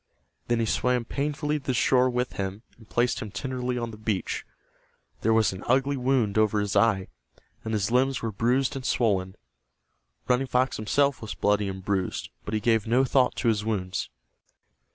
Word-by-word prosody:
Then 120 -1 +1
he 115 - +1
swam 125 +2 +1
painfully 150 +3 -1
to - - -20
the 130 - 0
shore 130 +1 +4
with 125 0 -1
him, 100 +2 -4
and 110 -2 -19
placed 120 +1 +1
him 110 - -5
tenderly 125 +4 -3
on 120 -1 -3
the 105 - -10
beach. 110 -3 -2 0.8
There 110 - +2
was 110 -3 +3
an 95 - -8
ugly 135 +3 +2
wound 125 -5 +1
over 110 -1 +3
his 105 -1 -2
eye, 105 -5 +3 0.6
and 110 - -4
his 105 0 0
limbs 130 +1 +2
were 115 - -1
bruised 125 +7 +1
and 135 - -5
swollen. 100 -7 0 0.9
Running 125 +2 +2
Fox 130 +1 +1
himself 140 +6 +1
was 105 -4 -6
bloody 105 +2 +1
and 95 -1 -7
bruised, 95 -2 -2
but 105 - -3
he - - +1
gave 110 0 +1
no 125 +4 +3
thought 130 0 +2
to - - -1
his 105 -2 +2
wounds. 95 -4 -2
115 Hz, 185 wpm, -26 LUFS, 105-130 Hz, 0.9 s, shore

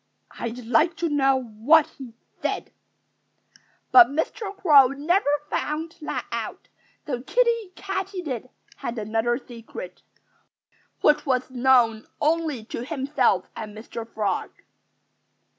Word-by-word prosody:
I'd 235 +1 -5
like 315 +8 +3
to 340 - -1
know 270 -2 +3
what 245 +8 +4
he 245 -4 -9 0.3
said." - - -3 1.2
But 365 -2 +9
Mr. 320 - -3
Crow 290 -9 +7
never 290 +6 +1 0.2
found 320 +3 -3
that 300 - -3
out. - - -5 0.4
So 255 -5 -3
Kiddie 465 - +1
Katydid 365 - -4 0.3
had 235 - -5
another 225 +2 0
secret, 230 -8 -10 1.0
which 300 - +4
was 255 -1 0
known 245 -3 +3
only 310 -5 0
to 230 +1 -6
himself 265 - +1
and 215 -1 -7
Mr. 230 +1 -8
Frog. 205 -3 -1
265 Hz, 110 wpm, -24 LUFS, 235-320 Hz, 1.2 s, But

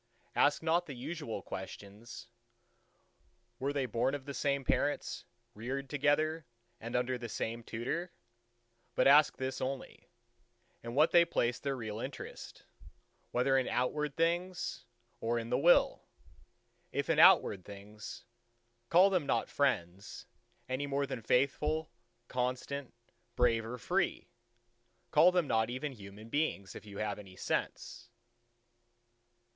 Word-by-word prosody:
Ask 145 +2 +3
not 170 +2 +2
the 140 - -6
usual 125 - -5
questions, 100 +4 -8 1.3
Were 140 +2 0
they 140 -2 0
born 125 +3 0
of 135 -2 -7
the 140 - -5
same 140 -1 0
parents, 145 +4 0 0.3
reared 130 +5 -5
together, 150 +1 +1 0.3
and 115 +1 -6
under 125 0 0
the 120 -1 -6
same 115 +2 -3
tutor; 130 +11 -3 0.8
but - - +3
ask 145 +2 +6
this 130 0 -3
only, 130 0 -5 0.7
in 115 +1 -6
what 150 +3 +5
they 170 -1 +7
place 120 -7 0
their 140 -1 -2
real 110 -3 -5
interest—whether 130 0 -5
in 130 -1 +2
outward 145 +3 -1
things 175 +2 -1 0.3
or 115 +1 0
in 115 0 -4
the 125 - +3
Will. 175 +5 +5 0.9
If - - -1
in - - +2
outward 95 -3 +6
things, 105 +2 -10 0.6
call 185 +3 +6
them 175 -7 +1
not - - +1
friends, 100 -9 -1 0.4
any 130 +2 -2
more 140 0 0
than 130 -3 -5
faithful, 150 +6 +1 0.4
constant, 130 +2 -3 0.4
brave 115 -2 +3
or 125 +2 -5
free: 180 - -1 0.8
call 165 +4 +7
them 180 -2 +2
not 110 -4 +1
even 130 +4 -3
human 105 -1 -11
beings, 130 -9 -1
if - - -10
you 100 -1 -9
have 105 0 -2
any 95 -2 -12
sense. 120 - -3
130 Hz, 130 wpm, -33 LUFS, 115-145 Hz, 1.3 s, they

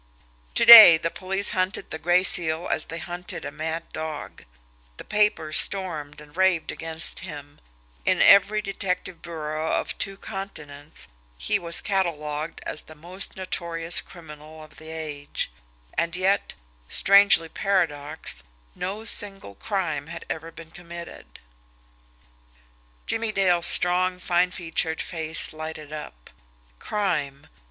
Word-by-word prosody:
To - - +4
day, 220 -8 +12
the 165 +1 -3
police 195 +2 +1
hunted 185 0 -2
the 160 - -5
Gray 175 +3 +2
Seal 165 -2 +3
as - - -1
they 165 - -6
hunted 175 +1 -7
a - - -6
mad 160 +1 -4
dog; 155 -1 -7 0.5
the - - -8
papers 210 -7 +2
stormed 155 -7 -2
and 150 0 -16
raved 185 -3 +1
against 165 0 0
him: 145 -5 -10 0.4
in - - +1
every 200 +2 +5
detective 185 -3 -4
bureau 155 -1 -5
of - - -2
two 195 -1 -2
continents 150 -8 -8 0.3
he - - 0
was 170 0 +1
catalogued 160 -5 -3
as - - -3
the 155 - -14
most 175 +5 -5
notorious 170 -2 0
criminal 155 -2 -13
of 155 - -17
the 160 +2 -11
age 150 - -5 0.4
and 170 +1 -1
yet, 195 +2 0 0.3
strange 200 0 +6 0.2
paradox, 160 -7 -2 0.3
no 200 +4 -5
single 195 - 0
crime 160 - -4
had 170 +1 -9
ever 160 +1 -6
been 165 0 -13
committed! 170 - -11 1.7
Jimmie 225 -1 -2
Dale's 180 -4 +2
strong, 180 +1 +4
fine 180 0 +1
featured 165 -2 -2
face 160 -2 +2
lighted 155 -1 -8
up. - - -10 0.5
Crime! 150 -10 -3
170 Hz, 130 wpm, -24 LUFS, 155-185 Hz, 1.7 s, day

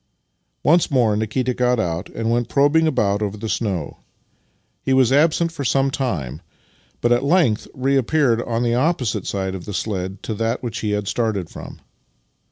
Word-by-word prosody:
Once 170 +3 +4
more 120 -6 +2
Nikita 115 +4 -1
got 125 -1 +1
out 85 -2 -2
and 115 0 -2
went 120 0 0
probing 145 +3 +3
about 105 -8 +1
over 105 0 -2
the 110 +2 -5
snow. 95 -9 -2 0.8
He 135 - 0
was 130 -2 +4
absent 160 +4 +3
for 160 -4 -5
some 135 +2 +2
time, 80 - -3 0.6
but 120 - +2
at 120 +2 +3
length 140 - +2
reappeared 135 -1 +2
on 120 0 -2
the 120 -1 +1
opposite 130 - 0
side 95 -1 -2
of 95 -2 -7
the 105 - -5
sledge 95 -3 -3
to 110 - -3
that 115 +4 -2
which 120 -4 -4
he 110 - -2
had 105 -1 -1
started 110 -7 -1
from. - - -10
120 Hz, 175 wpm, -21 LUFS, 105-135 Hz, 0.8 s, Once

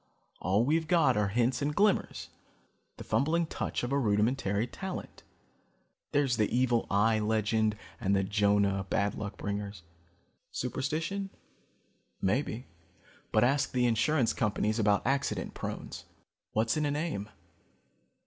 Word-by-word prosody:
All 100 +5 +2
we've 160 +3 +1
got 165 -8 +4
are 105 -1 +2
hints 120 +6 +1
and 145 +1 -1
glimmers, 205 -1 +1 0.7
the - - -7
fumbling 165 +5 +1
touch 160 - -3
of 120 - -2
a 140 - +2
rudimentary 105 -1 +1
talent. 190 +9 -7 0.9
There's 140 -5 +2
the 105 -2 +2
evil 120 -1 +2
eye 110 +2 +3
legend 110 0 +1 0.2
and 100 -4 +1
the 95 - +2
Jonah, 100 -1 +2
bad 100 0 +1
luck 105 -3 -6
bringers. 100 -2 -4 0.7
Superstition? 160 +10 -2 0.9
Maybe; 120 +4 -1 0.7
but - - +4
ask 135 +3 +2
the 125 -1 +2
insurance 120 +3 +2
companies 110 0 0
about 105 -2 +2
accident 135 +2 -1
prones. - - -6 0.5
What's 115 +1 +1
in 150 -1 +1
a - - 0
name? 145 -9 -2
115 Hz, 130 wpm, -30 LUFS, 105-140 Hz, 0.9 s, got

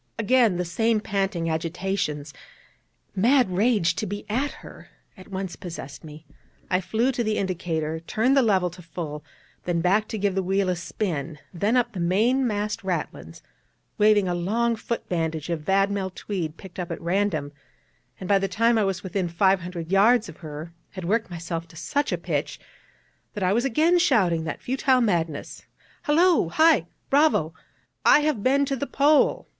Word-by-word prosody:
Again 230 -3 +3
the 180 - -1
same 225 +6 +1
panting 195 -4 -2
agitations, 160 -2 -2 0.8
mad 240 +2 +3
rage 200 -5 +2
to 215 - -2
be 205 +2 -5
at 270 +6 0 0.2
her, - - -13 0.3
at 185 - -14
once 190 -2 -5
possessed 160 -5 -8
me; 155 0 -11 0.5
I 185 0 +2
flew 230 +7 0
to 245 -2 -2
the 215 -1 -1
indicator, 165 -4 -2
turned 225 +10 +1
the 275 - +5
lever 190 -6 +2
to 180 +1 -12
full, 155 -3 -6 0.4
then 175 -1 0
back 195 +5 +2
to 220 - -4
give 200 -1 0
the 190 - 0
wheel 190 +1 0
a 180 - +1
spin, 170 -4 -4 0.2
then 205 +8 +1
up 240 -1 +1
the 195 - -6
main 225 +10 +2
mast 210 -1 -2
ratlins, 165 - -4 0.6
waving 210 -2 +4
a 175 - 0
long 225 +7 0
foot 230 +1 -5
bandage 165 -2 -2
of 165 -2 -2
vadmel 195 +3 +1
tweed 175 -4 -5
picked 190 -1 -11
up 175 - -4
at - - -5
random, 170 -4 -1 0.7
and 185 - -6
by 200 0 +4
the 195 - -1
time 230 +4 +2
I - - +2
was 190 -2 -2
within 185 -1 -2
five 190 +3 +3
hundred 170 -1 -6
yards 215 +4 +4
of - - -11
her, 155 +1 -8 0.2
had 185 -3 -6
worked 220 +4 0
myself 170 -1 -5
to 165 - -17
such 225 - -1
a - - 0
pitch, - - -3 0.8
that 205 - -3
I 185 +1 +2
was 240 +4 +1
again 315 +8 +3
shouting 190 - +2
that 160 - -5
futile 260 0 +2
madness: 170 -9 -1 0.5
'Hullo! 330 - +4
Hi! 315 - +4 0.2
Bravo! 275 - +3 0.5
_I 295 - +6
have 300 -8 0
been 275 +5 +3
to 275 0 -1
the 280 +2 -4
Pole! 290 +2 +3
195 Hz, 175 wpm, -24 LUFS, 170-230 Hz, 0.8 s, I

